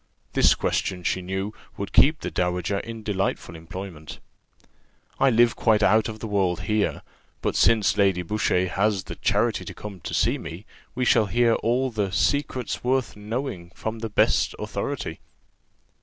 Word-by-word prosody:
This - - +5
question, 90 -2 -1
she 95 - 0
knew, 95 +3 -3 0.2
would 100 - -5
keep 155 +3 +5
the - - -4
dowager 90 +2 -1
in 115 0 -7
delightful 95 -4 -2
employment. 80 -1 -8 1.0
"I 135 - +5
live 120 -1 +4
quite 110 -2 +3
out 110 +3 +4
of 110 - -6
the 110 - -6
world 95 -4 0
here; 105 +2 0 0.4
but - - 0
since 110 -3 +4
Lady 95 -3 +3
Boucher 95 -1 +1
has 100 +1 0
the - - -8
charity - - +1
to - - -8
come 100 -3 -8
to - - -5
see - - +2
me, 85 +6 -8 0.3
we 125 0 0
shall 110 -3 +4
hear 115 +4 +3
all 125 +3 0
the 105 -4 -1
'secrets 130 0 0
worth 130 0 0
knowing,' 105 -4 -4
from 110 0 -4
the 115 0 -4
best 105 - +2
authority." - - -4
105 Hz, 160 wpm, -25 LUFS, 95-115 Hz, 1.0 s, This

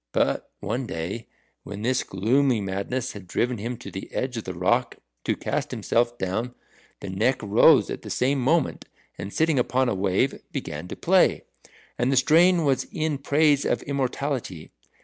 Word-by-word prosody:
But - - 0
one 120 +4 -2
day, 95 +8 -5 0.3
when 105 +1 -8
this 130 +2 +1
gloomy 120 +6 +1
madness 100 +6 -3
had 100 -3 -10
driven 120 +6 -1
him 120 +3 -4
to - - -9
the 95 - -7
edge 130 -1 -2
of 115 - -5
the 95 - -5
rock 120 +8 +1 0.3
to - - +1
cast - - -2
himself 120 +1 0
down, 115 +6 -3 0.5
the 100 - -6
Neck 110 +8 +1
rose 105 0 +5
at - - -5
the - - -9
same 135 +2 +1
moment, 150 +3 +1 0.3
and 100 - -5
sitting 160 0 +2
upon 125 +1 +1
a - - 0
wave, 95 +6 0
began 75 +4 -5
to - - -6
play. - - +3 0.6
And 125 +2 +2
the 135 - +2
strain 165 +5 +5
was 135 -2 +1
in 155 -5 -1
praise 145 0 +3
of - - 0
immortality. 135 - -3
125 Hz, 170 wpm, -25 LUFS, 100-135 Hz, 0.6 s, rose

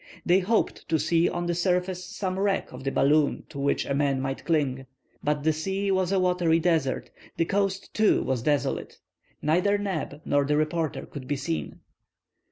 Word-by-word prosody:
They 180 +2 +5
hoped 210 +4 0
to 160 - +3
see 165 +3 +2
on 175 - -3
the 175 - 0
surface 180 +1 0
some 185 0 -4
wreck 195 -1 0
of 125 +1 -9
the 135 - -1
balloon 145 +2 +2
to 140 - -8
which 140 0 +1
a - - -1
man 140 -1 +1
might 135 0 -3
cling. 135 -5 0 0.4
But 150 -1 0
the 160 0 +3
sea 195 +5 -1
was 190 -1 +1
a 195 - +3
watery 180 -3 +2
desert. 160 -6 0 0.3
The 165 - +2
coast, 195 +1 -1
too, 215 -1 +3
was 130 -3 -1
desolate. 145 +3 -1 0.5
Neither 180 +7 +3
Neb 185 -8 -3
nor 145 0 +2
the 150 +1 +1
reporter 155 +1 -1
could 135 -3 -9
be 145 - 0
seen. 80 - -4
165 Hz, 180 wpm, -26 LUFS, 145-185 Hz, 0.5 s, They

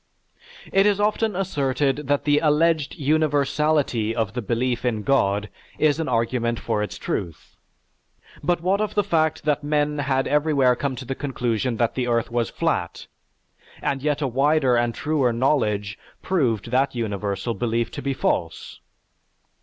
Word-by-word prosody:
It 195 +1 +5
is 205 -1 +2
often 210 0 +1
asserted 145 -5 -1
that 145 0 +1
the 145 0 +3
alleged 155 0 +2
universality 145 -5 +1
of 110 -3 -1
the 125 - -3
belief 120 +2 -1
in 115 -4 -1
God 105 -6 +1 0.3
is 155 0 +2
an 160 - -2
argument 115 0 0
for 105 - -1
its 105 - -4
truth. 85 -5 -5 0.9
But 175 -1 +1
what 190 +4 +1
of 215 - -2
the 205 - +3
fact 160 -5 0
that 150 -1 0
men 150 0 0
had 135 -1 0
everywhere 145 -4 +3
come 135 +1 -2
to 130 +1 -8
the 135 - -3
conclusion 125 -4 -2
that 115 0 +1
the 125 -2 -2
earth 115 -1 0
was 120 -1 0
flat, - - -2 0.7
and 135 -1 -2
yet 150 +1 0
a - - +1
wider 135 +1 +2
and 120 -1 +1
truer 145 -5 +1
knowledge 110 -5 0 0.2
proved 120 - 0
that 130 +1 +1
universal 105 0 -2
belief 115 0 -1
to - - -6
be 135 +1 -2
false! 80 -9 -2
135 Hz, 155 wpm, -23 LUFS, 115-150 Hz, 0.9 s, It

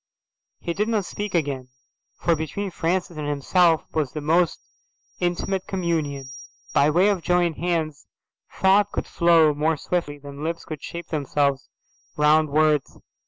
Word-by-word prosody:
He 170 - -3
did 210 +4 0
not 215 -4 0
speak 205 0 -4
again, 140 -6 -1 0.5
for 170 - +1
between 170 +6 -4
Francis 175 0 -1
and 150 -1 -3
himself 160 +3 +3
was 150 -4 -1
the 155 - -3
most 165 +3 +2 0.6
intimate 180 +2 -1
communion. 155 -7 -2 0.4
By 145 - +4
way 180 +6 +4
of 195 -4 0
joined 175 -2 +1
hands 165 -4 -2 0.4
thought 200 +2 +3
could - - -3
flow 165 -3 +4
more 155 +2 +1
swiftly 150 -3 -2
than 145 0 -9
lips 165 +1 -3
could 155 -3 -7
shape 170 0 -7
themselves 140 -2 0 0.5
round 150 +1 +4
words. 150 -1 +1
160 Hz, 145 wpm, -24 LUFS, 150-180 Hz, 0.6 s, By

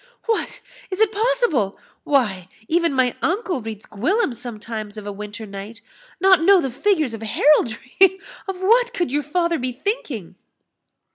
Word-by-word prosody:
"What! 455 -2 -1 0.3
is 375 0 -4
it 440 -2 +4
possible? 435 - +1 0.3
Why, 205 -11 +1 0.2
even 335 0 +2
my 260 -2 +1
uncle 360 - 0
reads 220 -1 -7
Gwillym 285 - 0
sometimes 220 -3 -7
of 210 - -7
a 205 - -4
winter 210 +2 -7
night 200 +3 -8 0.4
Not 380 -3 +5
know 385 +3 +6
the 270 -6 -2
figures 315 - +1
of 225 - -7
heraldry! 290 - +3 0.3
of 380 -1 -4
what 480 +5 +3
could 350 - -1
your 295 +2 +1
father 340 +3 0
be 255 0 -2
thinking?" 245 - -4
280 Hz, 150 wpm, -22 LUFS, -, 0.4 s, know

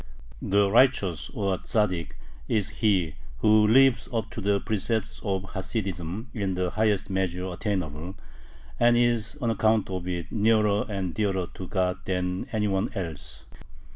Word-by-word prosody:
The 100 +1 +3
Righteous, 105 - +3
or 100 -3 -1
Tzaddik, 90 - -1 0.3
is 105 -2 +1
he 95 -8 +2 0.2
who 105 - +5
lives 130 +2 +4
up 115 -1 -2
to 115 - -6
the 100 0 +2
precepts 110 +1 -2
of 95 -2 -2
Hasidism 95 +1 -4
in 100 -4 -2
the 90 -1 -1
highest 105 -2 +1
measure 90 -1 -1
attainable, 90 -3 -3 0.6
and 120 0 +5
is 120 -2 +1
on 115 - +2
account 110 -2 +2
of 90 -1 -4
it 85 -2 -4
nearer 105 -1 +3
and 95 -4 -3
dearer 95 -3 0
to 95 - -7
God 90 -1 0
than 90 0 -2
any 105 -2 0
one 95 -1 0
else. 85 -6 -6
100 Hz, 145 wpm, -26 LUFS, 90-110 Hz, 0.6 s, who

